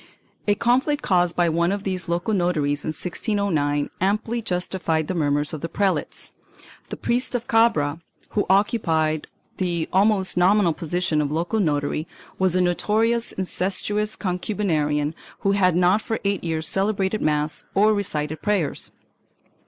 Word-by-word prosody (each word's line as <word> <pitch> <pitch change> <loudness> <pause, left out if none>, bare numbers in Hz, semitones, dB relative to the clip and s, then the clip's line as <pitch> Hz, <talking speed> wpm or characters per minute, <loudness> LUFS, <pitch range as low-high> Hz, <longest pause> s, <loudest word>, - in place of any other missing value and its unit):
3 205 - +5
A - - -3
conflict 260 +7 +1
caused 175 -2 +2
by 175 -1 +3
one 170 +2 +1
of 200 0 -3
these 185 -2 -2
local 175 +6 0
notaries 155 -6 0
in - - -6
1609 160 -4 -1
amply 215 +5 0
justified 180 -5 -1
the - - -2
murmurs 145 -2 0
of 155 - -5
the 165 - -4
prelates. 195 +2 -2 0.6
The - - -5
priest 245 +1 0
of 245 0 -3
Cabra, 190 -10 +2 0.3
who 205 - -1
occupied 165 -6 +1 0.3
the 175 -3 -1
almost 195 -1 +3
nominal 180 -1 +4
position 170 0 0
of 145 -1 -2
local 170 +8 -1
notary, 150 -2 0 0.3
was 185 -2 +2
a 185 - +3
notorious 220 +6 +1
incestuous 200 +3 -1
concubinarian, 165 -6 -1 0.3
who 195 - +2
had 185 -3 +3
not 180 +4 +3
for 225 - -3
eight 200 -2 0
years 160 -2 -1
celebrated 195 +2 0
mass 150 0 0
or 210 +2 +5
recited 155 -6 -1
prayers. 195 -8 -1
180 Hz, 145 wpm, -23 LUFS, 160-205 Hz, 0.6 s, 3